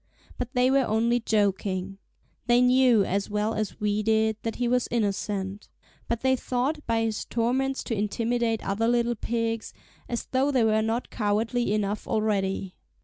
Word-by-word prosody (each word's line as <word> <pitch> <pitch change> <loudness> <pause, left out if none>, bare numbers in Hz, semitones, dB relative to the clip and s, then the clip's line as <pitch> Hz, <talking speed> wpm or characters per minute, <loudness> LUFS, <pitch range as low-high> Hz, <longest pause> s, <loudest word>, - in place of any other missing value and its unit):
But 250 +1 -4
they 250 +1 +4
were 275 - +4
only 230 +3 +2
joking. 195 -3 -1 0.5
They 240 0 +5
knew, 250 -4 +5
as 200 +2 -1
well 210 +1 0
as 215 0 -3
we 210 0 0
did, 220 0 +2
that 225 - -3
he 245 - -1
was 250 0 +1
innocent. 200 -3 -2 0.4
But 235 -1 -2
they 260 0 +3
thought 260 +5 -2
by 225 -1 +1
his 220 -1 -2
torments 260 +4 -1
to - - -3
intimidate 225 +2 -1
other 210 +4 0
little 240 0 +2
pigs, 230 0 -3 0.3
as 235 - -3
though 265 +2 +2
they 260 -4 +2
were 220 0 +3
not 225 +3 -2
cowardly 220 +2 0
enough 210 0 -1
already. 195 -3 -1
225 Hz, 160 wpm, -26 LUFS, 210-245 Hz, 0.5 s, They